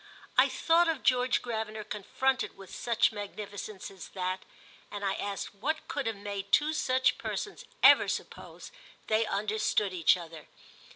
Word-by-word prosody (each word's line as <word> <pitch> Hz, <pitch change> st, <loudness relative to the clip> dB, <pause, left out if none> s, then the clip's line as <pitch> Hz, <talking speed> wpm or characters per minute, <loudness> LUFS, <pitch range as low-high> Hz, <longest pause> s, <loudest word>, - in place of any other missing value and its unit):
I -, -, +6 dB
thought 335 Hz, +1 st, +3 dB
of 320 Hz, -4 st, -1 dB
George 250 Hz, 0 st, +3 dB
Gravener 220 Hz, -2 st, -4 dB
confronted 255 Hz, +6 st, -1 dB
with 195 Hz, -1 st, -12 dB
such 235 Hz, -1 st, +2 dB
magnificence 205 Hz, -1 st, -7 dB
as 190 Hz, -2 st, -10 dB
that, 185 Hz, 0 st, -2 dB, 0.5 s
and 205 Hz, -1 st, -5 dB
I 195 Hz, -, +1 dB
asked 200 Hz, 0 st, -4 dB
what 290 Hz, +10 st, -3 dB
could 285 Hz, -5 st, -2 dB
have 225 Hz, -, -1 dB
made 200 Hz, 0 st, -6 dB
two 305 Hz, +1 st, +4 dB
such 260 Hz, -3 st, +2 dB
persons 415 Hz, -, -4 dB, 0.2 s
ever -, -, +8 dB
suppose -, -, -6 dB, 0.3 s
they 220 Hz, 0 st, +2 dB
understood 210 Hz, -1 st, 0 dB
each 170 Hz, 0 st, +4 dB
other. 165 Hz, -3 st, -10 dB
215 Hz, 150 wpm, -30 LUFS, 195-255 Hz, 0.5 s, ever